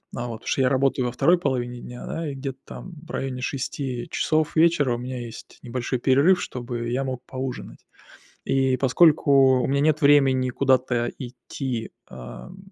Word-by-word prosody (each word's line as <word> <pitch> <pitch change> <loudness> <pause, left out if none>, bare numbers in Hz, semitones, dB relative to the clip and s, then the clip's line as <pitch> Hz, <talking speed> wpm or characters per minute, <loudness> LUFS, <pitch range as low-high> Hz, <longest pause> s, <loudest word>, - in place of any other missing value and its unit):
А 120 +1 -4
вот, 115 - -5
потому 115 - -16
что - - +1
я 130 - +3
работаю 135 -1 +1
во 120 - -2
2 150 +8 +3
половине 125 -5 -2
дня, 125 0 -9
да, 165 -2 -4
и 140 - -6
где-то 135 -1 -6
там 185 - -10
в - - -23
районе 130 -5 -4
6 130 -1 -4
часов 155 -1 0
вечера 160 -6 +3
у 120 - -3
меня 125 +1 -5
есть 115 -1 -10
небольшой 125 +1 -3
перерыв, 140 +9 +4
чтобы 120 -1 -5
я 130 +3 -1
мог 130 -1 -5
поужинать. 130 -1 -7 0.6
И 130 -1 +2
поскольку 135 -2 +4
у - - 0
меня 140 +1 +1
нет 155 +1 +2
времени 135 -3 +4
куда-то 125 -2 +1
идти, 125 -1 -5 0.2
ам, 65 - -10
130 Hz, 175 wpm, -24 LUFS, 125-140 Hz, 0.6 s, перерыв